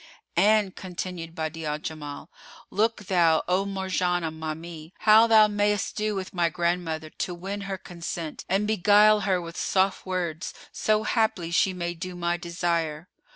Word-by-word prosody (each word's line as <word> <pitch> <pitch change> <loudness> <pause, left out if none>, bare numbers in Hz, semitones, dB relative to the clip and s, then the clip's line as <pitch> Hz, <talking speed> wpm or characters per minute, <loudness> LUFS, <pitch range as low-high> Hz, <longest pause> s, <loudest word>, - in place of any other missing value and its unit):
'" - - -48 0.2
"And," 210 -3 +2
continued 175 -2 -6
Badi'a 160 -1 -4
al 150 0 -1
Jamal, 150 0 -7 0.4
"Look 215 +1 0
thou, 170 -4 +3
O 185 +2 +2
Marjanah, 185 -4 -1
ma 160 -1 -4
mie,[FN#459] 165 0 -10
how 220 +1 +7
thou 220 -1 +7
mayst 205 -1 0
do 215 -1 -1
with 190 -1 -5
my 175 -2 +2
grandmother, 165 -2 -2
to 180 - -4
win 195 +4 -5
her 195 - -2
consent, 170 -3 -6
and 195 +3 +2
beguile 210 +1 +5
her 190 -2 +1
with 170 -1 -8
soft 190 0 +1
words, 175 -3 -3 0.2
so 215 0 +1
haply 215 -7 0
she 190 +2 +3
may 175 -1 -3
do 180 +2 -7
my 175 0 0
desire." 170 -2 -2
180 Hz, 160 wpm, -26 LUFS, 165-200 Hz, 0.4 s, how